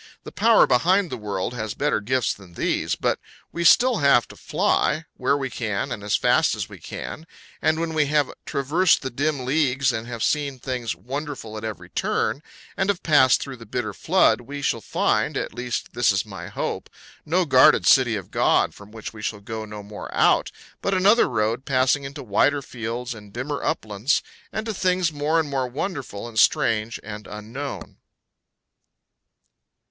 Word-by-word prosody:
The - - -9
Power 230 0 +5
behind 175 +8 +2
the - - -2
world 105 0 -3
has 110 -2 -4
better - - 0
gifts 125 +2 0
than 90 -4 -16
these; - - 0
but - - 0 0.3
we 170 - -3
still 245 +7 +6
have 140 -6 +4
to - - -12
fly, 160 +2 0
where 140 +2 +1
we 135 -2 -3
can 110 +3 -2
and 105 - -5
as 105 - +1
fast - - +3
as - - -4
we - - -12
can; 160 +2 -7 0.3
and 155 0 +2
when 165 -1 -2
we 155 -2 +2
have 145 -1 +1
traversed 155 +7 +2
the 130 - -3
dim 140 0 -1
leagues, 135 -2 +2
and 110 +1 -4
have 120 -2 -4
seen 145 -3 0
things 125 -3 -3
wonderful 135 -4 -6
at 110 - -6
every 105 -6 -6
turn, 145 - -1 0.3
and 190 0 0
have 190 -3 0
passed 135 -5 +5
through 135 -2 -8
the 115 - -12
bitter 120 -4 -3
flood, 185 -6 +3
we 140 +3 -7
shall 115 - 0
find - - 0
at - - -3
least 125 -1 -4
this 120 -3 +3
is 100 +1 0
my 95 -4 -8
hope - - -4 0.3
no 175 +4 +1
guarded 130 -4 +6
city 130 -4 +5
of 95 -4 -7
God - - +2
from 100 0 -14
which 110 0 -8
we 110 - -10
shall 105 0 -3
go 110 +2 -6
no 105 -1 -8
more 105 +1 -8
out, - - +3 0.3
but 195 - 0
another 200 +5 +4
road 110 +4 0
passing 135 +1 +2
into 135 +1 -7
wider 135 +6 +2
fields 120 +1 -5
and 105 -2 -13
dimmer 135 +6 -4
uplands, 110 +7 0 0.3
and 220 - -3
to 220 - -2
things 180 -4 +1
more 150 +3 +1
and 160 - 0
more 135 -2 -1
wonderful 130 - -5
and 110 -2 -2
strange 115 +1 +2
and 105 -1 -8
unknown. 115 +7 -7
130 Hz, 185 wpm, -23 LUFS, 110-150 Hz, 0.3 s, still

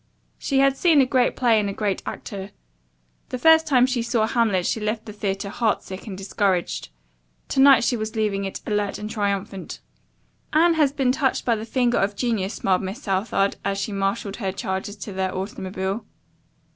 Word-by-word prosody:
She 275 - -1
had 275 0 +4
seen 325 -3 +4
a 270 - +6
great 255 -1 +2
play 235 -4 +3
and 205 -1 -1
a - - -3
great 200 -2 -1
actor. 195 -1 -6 0.8
The 255 - -3
first 320 +3 +5
time 255 -4 +5
she 255 -2 -1
saw 230 -1 +1
"Hamlet" 220 -6 +1
she - - 0
left 215 +1 -2
the 210 - -8
theatre 200 -1 -3
heartsick 205 -3 -2
and 190 -3 -6
discouraged. 195 -2 -1 0.6
To - - -1
night 275 -2 +7
she 245 - +1
was 220 0 -4
leaving 210 -3 0
it 195 - -5
alert 210 -1 -1
and 210 - -5
triumphant. 200 -2 -3 0.7
"Anne 335 +2 +5
has 300 -4 +3
been 270 -3 +1
touched 270 -1 0
by 235 - +3
the 220 0 -5
finger 245 0 +1
of 200 +1 0
Genius," 215 -4 -1
smiled 190 -1 +1
Miss 195 +9 -6
Southard, 195 0 0
as 195 0 -1
she 195 +2 -3
marshaled 195 0 -2
her 195 -5 -2
charges 190 +1 -4
to 205 0 -8
their 190 0 -2
automobile. 190 +1 -4
210 Hz, 185 wpm, -23 LUFS, 195-245 Hz, 0.8 s, night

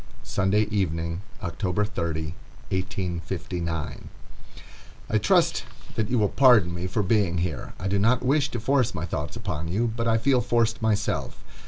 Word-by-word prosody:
Sunday 100 +2 +2
Evening, 85 -3 -1 0.2
October 90 +3 -1
30, 80 -6 -3 0.4
1859.] 90 -2 -3 1.0
I - - +4
trust - - +3 0.3
that 110 -2 -1
you 125 - +1
will 105 -2 +3
pardon 115 -9 +5
me 90 +2 -3
for 100 +3 0
being 95 -3 +2
here. 85 -5 -3
I 95 - -3
do 100 +1 +1
not 115 +5 +3
wish 140 +1 +3
to 120 - -4
force 125 +1 +1
my 80 - -2
thoughts 75 -4 -4
upon 80 +2 -3
you, 110 +7 0
but 115 0 -1
I 115 0 +4
feel 125 +2 +3
forced 115 -2 +1
myself. 110 -2 -1
100 Hz, 155 wpm, -26 LUFS, 85-115 Hz, 1.0 s, pardon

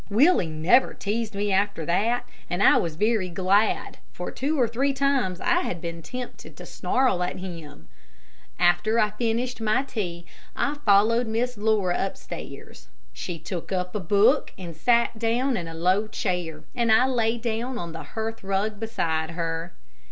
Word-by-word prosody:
Willie 230 - +4
never 165 +12 +3
teased 215 +1 -3
me 205 0 -1
after 200 -4 0
that, 220 +9 +1 0.2
and 175 +3 0
I - - +7
was 165 -3 -1
very 210 0 +1
glad, 190 +4 +1
for - - -6
two 290 +3 -1
or 245 - +4
three 265 +5 0
times 270 -9 +1
I 350 0 +2
had 175 - -3
been 170 0 -6
tempted 250 +9 -8
to - - -9
snarl 255 -8 +1
at 180 - -2
him. 165 - -9 0.7
After 180 +6 +3
I 210 -2 +3
finished 235 +2 -2
my 225 +5 +2
tea, 180 -10 -4 0.3
I 285 - 0
followed 220 +4 +4
Miss 240 +3 -1
Laura 205 -4 +1
upstairs. 195 - -8 0.3
She 175 -2 -5
took 170 +3 -6
up 180 -1 -2
a 210 - -1
book 200 +3 +3
and 175 -4 -8
sat 235 +5 +2
down 240 +3 +1
in 175 -6 -3
a 165 - -7
low 185 +6 +2
chair, 175 -7 -3
and 235 -2 +1
I 220 +4 +6
lay 235 -3 +1
down 235 +2 -3
on 170 -6 -5
the 165 0 -7
hearth 220 +9 -5
rug 200 +2 -1
beside 160 -8 -1
her. 165 0 -4
210 Hz, 165 wpm, -25 LUFS, 175-235 Hz, 0.7 s, I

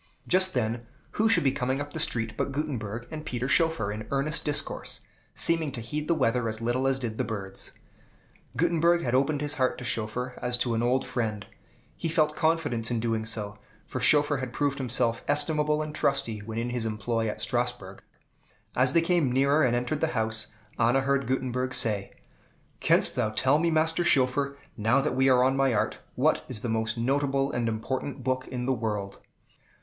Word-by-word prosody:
Just 185 -2 +4
then 120 0 -1 0.2
who 220 +1 +2
should 180 -7 +4
be 135 - +3
coming 130 0 -1
up 145 0 -6
the 160 - -4
street 115 -6 0
but 140 - -2
Gutenberg 120 -6 -3
and 155 -1 -6
Peter 125 -4 -3
Schoeffer, 150 - +2
in 110 +1 -6
earnest 150 +3 0
discourse, 150 0 -1 0.3
seeming 165 -3 +2
to - - -5
heed 150 +7 -4
the 170 - +2
weather 115 -5 +1
as 110 0 -5
little 120 +3 0
as 135 -1 +1
did 115 -4 -5
the - - +2
birds. 100 -4 -5 0.8
Gutenberg 170 +1 +3
had 120 - -1
opened 140 +3 +2
his 145 0 -1
heart 130 - +2
to - - -7
Schoeffer 125 +2 -2
as 125 0 0
to 120 -1 0
an 115 - 0
old 125 +2 +1
friend; 110 -5 -2 0.5
he 165 - -3
felt 155 -1 +2
confidence 155 -8 0
in 120 -2 0
doing 110 -1 -1
so, 105 -2 -4 0.3
for - - -5
Schoeffer 145 -1 +4
had 130 -2 -5
proved 140 -1 0
himself 120 -2 0
estimable 150 +1 +2
and 155 0 -6
trusty 135 -7 0
when 110 +2 -7
in 120 +1 -2
his 120 -2 -2
employ 110 +1 -1
at - - -5
Strasbourg. 120 -6 -3 0.7
As 130 +1 +3
they 170 - +5
came 165 -6 +2
nearer 140 +4 +3
and 125 -4 +3
entered 125 +5 -1
the 160 - +3
house, 110 -1 0 0.3
Anna 120 +4 +3
heard 140 -2 0
Gutenberg 130 0 -1
say, 105 -5 0 0.7
"Canst - - +4
thou 120 -4 +1
tell 130 +7 +2
me, 170 +1 +2
Master 160 +1 +1
Schoeffer, 140 -1 +2 0.2
now 110 +5 +2
that 145 +2 -1
we 130 +1 +4
are 125 -1 +5
on 130 +1 +3
my 135 -3 +2
art, 105 - 0 0.2
what - - +2
is 115 -5 -5
the 120 - -3
most 110 0 -1
notable 135 +2 +1
and 120 -1 -1
important 130 +4 -4
book 130 0 -1
in 125 -1 -4
the 135 - +2
world?" 105 -4 -3
130 Hz, 195 wpm, -27 LUFS, 115-145 Hz, 0.8 s, they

